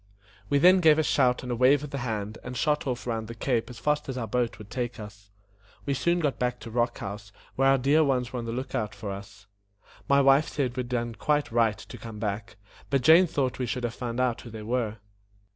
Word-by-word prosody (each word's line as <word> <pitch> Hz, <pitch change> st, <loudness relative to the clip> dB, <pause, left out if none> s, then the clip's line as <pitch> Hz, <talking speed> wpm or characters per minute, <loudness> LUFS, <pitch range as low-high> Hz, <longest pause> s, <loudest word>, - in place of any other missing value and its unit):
We 145 Hz, -, +3 dB
then 180 Hz, +6 st, +6 dB
gave 160 Hz, -3 st, +5 dB
a 155 Hz, -, +3 dB
shout 125 Hz, -4 st, +2 dB
and 125 Hz, -, -4 dB
a -, -, 0 dB
wave 130 Hz, +4 st, +4 dB
of 150 Hz, -, -7 dB
the 140 Hz, -, -3 dB
hand, 110 Hz, -3 st, -4 dB
and 125 Hz, 0 st, -6 dB
shot 150 Hz, +1 st, 0 dB
off 125 Hz, -1 st, -3 dB
round 115 Hz, -2 st, -3 dB
the 115 Hz, -, -8 dB
cape 120 Hz, 0 st, -1 dB
as 120 Hz, -, -9 dB
fast 150 Hz, +3 st, -1 dB
as 130 Hz, -, -4 dB
our 120 Hz, -, -2 dB
boat 120 Hz, 0 st, -1 dB
would 105 Hz, -2 st, -12 dB
take 120 Hz, -2 st, -3 dB
us. 105 Hz, -1 st, -11 dB, 0.6 s
We 140 Hz, -, 0 dB
soon 170 Hz, +6 st, +1 dB
got 145 Hz, -5 st, -1 dB
back 125 Hz, 0 st, -1 dB
to 115 Hz, -, -8 dB
Rock 120 Hz, +1 st, 0 dB
House, 100 Hz, +1 st, -7 dB, 0.2 s
where 135 Hz, +1 st, +3 dB
our 135 Hz, 0 st, +5 dB
dear 140 Hz, +5 st, +3 dB
ones 130 Hz, -4 st, 0 dB
were 125 Hz, -, -2 dB
on 115 Hz, -, -5 dB
the 115 Hz, -, -3 dB
look 130 Hz, +3 st, -5 dB
out 105 Hz, -2 st, -2 dB
for 105 Hz, -3 st, -5 dB
us. 100 Hz, +1 st, -10 dB, 0.6 s
My 140 Hz, 0 st, +5 dB
wife 135 Hz, +2 st, +5 dB
said 130 Hz, -4 st, -2 dB
we -, -, -3 dB
had 120 Hz, -, -7 dB
done 120 Hz, -2 st, -2 dB
quite 145 Hz, +6 st, 0 dB
right 115 Hz, -3 st, +2 dB
to 105 Hz, -, -10 dB
come 115 Hz, -2 st, -8 dB
back, 105 Hz, 0 st, -4 dB, 0.3 s
but 135 Hz, -3 st, +1 dB
Jane 165 Hz, +6 st, +7 dB
thought 135 Hz, -5 st, -1 dB
we 125 Hz, -, -1 dB
should 125 Hz, +2 st, -3 dB
have 120 Hz, -1 st, -2 dB
found 120 Hz, -1 st, -4 dB
out 125 Hz, -2 st, 0 dB
who 120 Hz, -, -10 dB
they 110 Hz, -1 st, -8 dB
were. 115 Hz, -1 st, -1 dB
125 Hz, 250 wpm, -27 LUFS, 115-140 Hz, 0.6 s, Jane